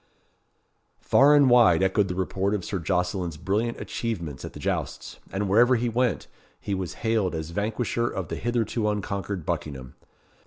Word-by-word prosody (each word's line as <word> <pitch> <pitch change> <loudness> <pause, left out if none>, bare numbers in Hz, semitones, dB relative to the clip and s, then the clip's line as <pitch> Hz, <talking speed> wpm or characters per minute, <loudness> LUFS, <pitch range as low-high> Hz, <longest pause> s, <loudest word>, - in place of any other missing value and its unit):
Far 145 +2 +5
and 145 -2 +6
wide 115 -9 +5
echoed 95 +1 +2
the 90 - -4
report 95 +2 -1
of 95 - -4
Sir 95 - -3
Jocelyn's 90 -1 -1
brilliant 105 +8 -1
achievements 85 - -4
at - - -7
the - - -9
jousts; - - -4
and 100 +1 -2
wherever 120 +6 +5
he 120 0 0
went, 120 +1 0 0.3
he 100 - -4
was 95 -4 -3
hailed 110 -6 +1
as 80 0 -5
vanquisher 110 +4 -1
of - - -5
the - - -3
hitherto 115 -2 -1
unconquered 100 -3 -3
Buckingham. 65 -4 -4
100 Hz, 160 wpm, -26 LUFS, 90-115 Hz, 0.3 s, and